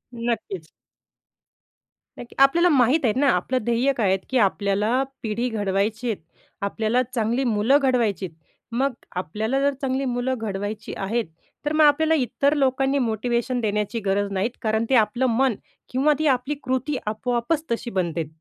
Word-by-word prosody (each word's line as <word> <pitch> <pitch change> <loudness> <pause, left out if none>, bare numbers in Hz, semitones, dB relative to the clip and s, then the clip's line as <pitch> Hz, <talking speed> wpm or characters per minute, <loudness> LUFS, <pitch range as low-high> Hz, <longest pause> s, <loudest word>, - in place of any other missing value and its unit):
नक्कीच. 220 -8 -3 1.5
नक्की, 240 - -10
आपल्याला 340 +6 +4
माहीत 265 0 +4
आहे 220 - +3
ना, 285 - +3
आपलं 190 +9 0
ध्येय 240 +3 +2
काय 230 -6 0
आहेत 190 +1 +2
की 260 - +1
आपल्याला 205 +6 +1 0.2
पिढी 225 +2 -1
घडवायची 210 +2 -1
आहेत. 215 - -2 0.4
आपल्याला 220 +4 0
चांगली 235 +2 0
मुलं 230 +3 +3
घडवायची 235 -8 +1
आहेत. 165 - -18 0.4
मग 260 +3 0 0.2
आपल्याला 215 - -1
जर 280 0 +2
चांगली 270 0 -1
मुलं 250 +1 -1
घडवायची 205 0 -4
आहेत 220 +4 -1 0.4
तर 295 - 0
मग 310 0 +4
आपल्याला 315 +2 +4
इतर 280 +1 +1
लोकांनी 270 0 +1
मोटिवेशन 240 +1 -1
देण्याची 210 +1 -1
गरज 200 +1 0
नाहीत. 195 +3 0
कारण 220 -1 0
ते 265 - +4
आपलं 240 +3 +2
मन 265 -3 +3 0.3
किंवा 275 +4 +3
ती 310 - +2
आपली 265 +2 +1
कृती 260 +3 -1
आपोआपच 240 +8 -1
तशी 235 +1 -2
बनतेत. 170 -4 -1
235 Hz, 155 wpm, -23 LUFS, 210-265 Hz, 1.5 s, आपल्याला